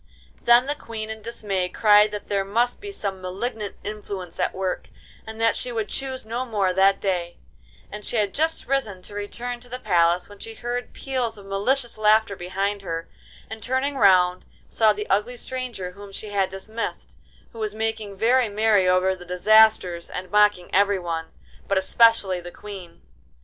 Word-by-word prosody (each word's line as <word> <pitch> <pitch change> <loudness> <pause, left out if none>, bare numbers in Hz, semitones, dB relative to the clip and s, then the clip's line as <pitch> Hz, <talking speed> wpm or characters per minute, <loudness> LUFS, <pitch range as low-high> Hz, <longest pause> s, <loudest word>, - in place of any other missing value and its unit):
Then 240 +1 +6
the 285 - 0
Queen 220 -6 -6
in 220 0 -7
dismay 205 -5 -2
cried 210 +1 +5
that 210 -1 -7
there 200 -1 0
must 235 +5 0
be 405 0 -6
some 195 - -4
malignant 205 +3 -4
influence 200 -4 -6
at - - +1
work, 185 -1 -3 0.4
and 220 0 -8
that 230 0 +3
she 250 - -3
would 220 -3 -2
choose 265 -2 -3
no 235 +3 -2
more 205 -7 0
that 195 +1 +4
day; 175 -3 -2 0.5
and 210 +1 -7
she - - -2
had 205 -3 +1
just 320 +2 0
risen 220 -9 -1
to 205 - -11
return 235 +4 -5
to 245 +1 -17
the 250 - -5
palace 175 -6 +2
when 205 -1 -14
she 225 0 -8
heard 245 +1 -4
peals 250 -5 -2
of 200 - -12
malicious 230 +5 0
laughter 215 -1 +4
behind 195 +3 -2
her, 165 -3 -5 0.4
and 220 0 -8
turning 260 +4 -1
round 185 -6 +4 0.2
saw 220 -1 +3
the 210 0 -3
ugly 210 +5 0
stranger 240 -8 -5
whom 200 +1 -12
she 210 +2 -7
had 195 -2 +1
dismissed, 215 +4 -5 0.4
who 230 - -10
was 215 -1 -3
making 220 -2 -3
very 240 +2 +3
merry 205 -2 +3
over 185 +1 +3
the 180 - -12
disasters 180 -1 +4
and 180 0 -6
mocking 210 -3 +3
everyone, 180 -4 +1 0.4
but 200 - +1
especially 200 -1 +4
the 175 - -8
Queen. 185 - -10
210 Hz, 175 wpm, -24 LUFS, 190-230 Hz, 0.5 s, Then